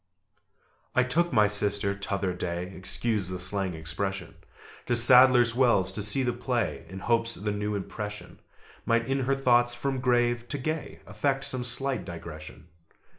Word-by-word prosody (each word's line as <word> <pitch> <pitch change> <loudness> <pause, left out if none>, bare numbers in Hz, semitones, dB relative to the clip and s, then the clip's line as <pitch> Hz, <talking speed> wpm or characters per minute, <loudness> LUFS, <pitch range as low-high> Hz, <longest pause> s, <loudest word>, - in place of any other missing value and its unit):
I 130 - +4
took 170 +7 0
my 105 -1 +4
sister 100 -1 +1
t'other 100 -2 -2
day 90 +1 -5
(Excuse 100 +1 -2
the 90 0 -5
slang 95 -1 -3
expression) 85 +3 -5 0.5
To 120 - +1
Sadler's 125 0 +7
Wells 120 -7 +2
to 105 - -3
see 105 +6 +1
the 120 -1 0
play, 120 -2 -3
In 95 - -8
hopes 115 +2 +1
the 105 +1 -3
new 105 0 -3
impression 105 +1 -7 0.4
Might 115 0 +1
in 135 +1 0
her 135 +1 0
thoughts, 120 -2 +2
from 135 +2 -3
grave 120 -1 +1
to 145 - -1
gay 155 +3 -5
Effect 135 +6 -2
some 130 -1 -3
slight 130 +1 -1
digression. 80 -2 -10
115 Hz, 155 wpm, -27 LUFS, 100-125 Hz, 0.5 s, Sadler's